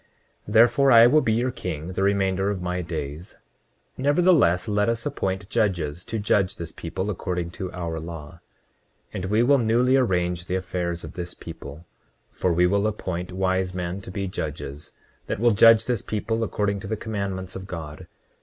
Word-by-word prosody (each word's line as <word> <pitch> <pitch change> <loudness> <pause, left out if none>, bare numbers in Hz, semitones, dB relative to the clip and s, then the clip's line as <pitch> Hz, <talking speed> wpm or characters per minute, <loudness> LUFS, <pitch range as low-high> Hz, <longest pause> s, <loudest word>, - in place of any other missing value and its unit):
29:11 105 - -5
Therefore 120 +4 +5
I 115 -1 +9
will 150 +6 +5
be 110 - +1
your 120 +3 +1
king 85 - -5
the 95 - -2
remainder 95 -1 +1
of 100 -2 -2
my 90 0 -2
days; 80 0 -6 0.6
nevertheless, 145 - +3
let 105 0 +1
us 115 -1 -2
appoint 95 -9 -2
judges, 90 -8 -1
to 115 - -3
judge 100 -2 +1
this 85 -1 -7
people 95 +4 -4
according 90 -2 -3
to 90 +1 -6
our 85 -2 -4
law; 80 0 -8 0.7
and 90 - -4
we 105 +4 +2
will 140 +2 +4
newly 120 +3 +3
arrange 90 -7 0
the 90 - -1
affairs 90 -2 -3
of - - -8
this 90 0 -6
people, 80 -1 -10 0.5
for 90 - 0
we 90 +1 +3
will 100 +3 +2
appoint 90 -4 -4
wise 95 0 0
men 90 +1 -3
to 95 - -10
be 100 +1 -3
judges, 75 -4 -6 0.3
that - - -3
will 120 +1 +4
judge 115 +1 +6
this 120 -5 -1
people 115 +1 -2
according 105 -2 -1
to 95 - -8
the 110 - -2
commandments 100 -4 -4
of 95 0 -7
God. 80 -5 -7
95 Hz, 180 wpm, -24 LUFS, 85-110 Hz, 0.7 s, I